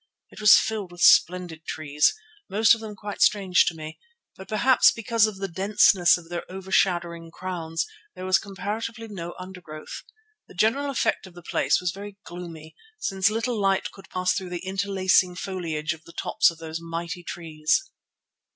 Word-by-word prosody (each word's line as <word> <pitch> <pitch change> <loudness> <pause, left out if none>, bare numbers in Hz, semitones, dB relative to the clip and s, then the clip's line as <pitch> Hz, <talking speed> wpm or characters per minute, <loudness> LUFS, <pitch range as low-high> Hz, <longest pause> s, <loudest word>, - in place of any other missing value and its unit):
It - - -11
was 210 -1 +8
filled 210 -5 -2
with 175 0 -11
splendid 175 -2 +4
trees, 150 - +1 0.3
most 220 +3 +5
of 225 - -3
them 215 -2 -7
quite 205 0 -7
strange 190 -5 +4
to 170 - 0
me, 155 0 -9 0.4
but 190 - -11
perhaps 240 +4 +5
because 230 -1 +2
of 210 -3 -6
the 195 0 -3
denseness 190 -1 +4
of 170 -2 -13
their 175 0 -4
overshadowing 175 -3 0
crowns 165 -2 -4 0.3
there 185 0 -7
was 185 +1 +3
comparatively 220 +3 -5
no 175 -5 -7
undergrowth. 180 -4 -9 0.5
The - - -16
general 250 +9 +1
effect 250 -6 -1
of 180 - -16
the 175 - -12
place 140 -1 +1
was 180 -1 -1
very 200 +1 -9
gloomy, 165 -3 -9 0.2
since 195 - +1
little 225 0 -2
light 195 -1 +1
could 195 - -16
pass 185 0 0
through 190 -2 -4
the 175 0 -6
interlacing 190 -1 +1
foliage 170 -5 -3
of 160 0 -15
the 170 - -14
tops 220 - +2
of 170 - -9
those 160 0 -6
mighty 170 +1 -5
trees. 165 - -1
185 Hz, 170 wpm, -25 LUFS, 170-205 Hz, 0.5 s, was